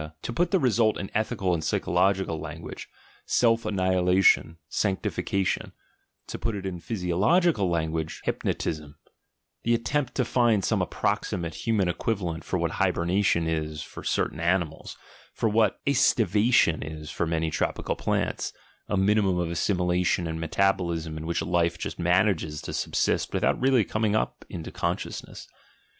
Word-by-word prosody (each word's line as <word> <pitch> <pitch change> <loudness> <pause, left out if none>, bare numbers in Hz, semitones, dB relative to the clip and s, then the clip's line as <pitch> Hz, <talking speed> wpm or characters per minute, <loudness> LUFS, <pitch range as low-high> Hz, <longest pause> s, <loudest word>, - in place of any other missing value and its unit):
To 120 - -4
put 175 +6 +1
the 190 - +3
result 115 - +2
in 95 - -6
ethical 100 -4 0
and 80 -2 -1
psychological 90 0 +1
language, - - -8 0.4
"self 115 -2 +2
annihilation," 95 -3 +3
"sanctification"; 95 +1 -1 0.5
to - - -7
put 115 -2 -2
it 95 -1 -5
in 90 -2 -4
physiological 100 - +1
language, 80 -2 -2
"hypnotism" 75 -2 -2 0.3
— - - -54
the 120 0 +3
attempt 125 +3 -1
to 125 - +1
find 115 -5 +2
some - - +1
approximate 85 -2 -1
human 100 +3 0
equivalent 90 -2 -2
for - - -2
what - - -1
hibernation 85 0 +1
is 80 -2 -2
for - - -10
certain 75 - -1
animals, 85 -2 -1 0.4
for - - +1
what 110 -2 +2
(estivation 110 - +3
is 75 0 -7
for 85 - -1
many 80 -1 0
tropical 75 - -1
plants, - - -1 0.4
a 105 - +1
minimum 95 -1 +3
of 85 -1 -1
assimilation 90 0 +1
and 80 0 -3
metab 95 +5 +2
olism 85 -3 -3
in 80 +1 -6
which 85 - -1
life 85 -1 +1
just - - -5
manages 90 -3 +2
to - - -5
subsist - - 0
without - - +1
r£ally 130 -5 +3
coming 110 -1 0 0.3
into 80 -2 -6
the - - -27
consciousness. - - -4
90 Hz, 145 wpm, -26 LUFS, 85-110 Hz, 0.5 s, the